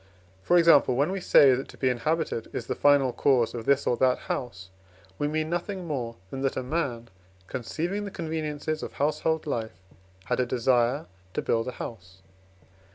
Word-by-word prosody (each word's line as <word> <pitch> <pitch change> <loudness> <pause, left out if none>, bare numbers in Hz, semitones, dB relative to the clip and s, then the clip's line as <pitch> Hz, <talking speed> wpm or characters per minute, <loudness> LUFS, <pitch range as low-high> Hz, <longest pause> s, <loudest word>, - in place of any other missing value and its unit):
For 175 - +3
example, 165 -7 +5
when 145 +7 +1
we 195 - -2
say 140 -6 +6
that 130 +2 -2
to - - -14
be 130 - 0
inhabited 125 0 -1
is - - -4
the - - -2
final 140 -3 +3
cause 125 -4 +2
of 115 -2 -6
this 140 0 +2
or 120 - +2
that 130 -1 +3
house, 95 -7 -5 0.5
we 145 - +1
mean 155 +1 -1
nothing 175 +2 -3
more 125 -7 -3 0.2
than 135 - -5
that 135 -1 -1
a 130 - -2
man, 125 -5 -3 0.4
conceiving 165 - -3
the - - -4
conveniences 155 -3 -3
of - - -6
household 155 +2 0
life, 110 -9 -3 0.5
had - - -1
a 125 - +2
desire 125 +4 +1 0.3
to - - -1
build 115 +1 0
a 125 - -4
house. 95 -4 -9
135 Hz, 180 wpm, -27 LUFS, 120-155 Hz, 0.5 s, say